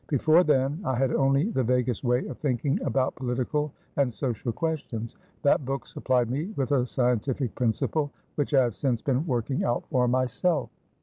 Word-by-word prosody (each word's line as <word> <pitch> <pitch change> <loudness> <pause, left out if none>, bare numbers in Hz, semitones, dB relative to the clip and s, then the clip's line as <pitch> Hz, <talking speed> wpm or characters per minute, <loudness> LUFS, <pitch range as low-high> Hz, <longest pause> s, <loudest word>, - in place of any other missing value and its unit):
Before 155 +4 +4
then, 145 +1 +1
I 130 - 0
had 130 +1 +1
only 135 +9 +2
the 130 - +1
vaguest 125 -1 0
way 125 0 +1
of - - -7
thinking 135 -1 0
about 130 -1 0
political 130 +4 -2 0.3
and 140 -3 +2
social 120 -1 -2
questions. 120 -6 -3 0.3
That 145 - +4
book 135 +1 -3
supplied 125 -2 0
me 145 +5 -1
with 135 -2 -1
a 130 -3 +2
scientific 125 0 0
principle, 130 +5 0 0.2
which 145 0 -1
I 135 - +6
have 120 -2 -1
since 125 -5 -1
been 135 +4 0
working 130 0 -1
out 120 - 0
for 125 -1 +3
myself." 130 +5 0
130 Hz, 175 wpm, -27 LUFS, 125-145 Hz, 0.3 s, I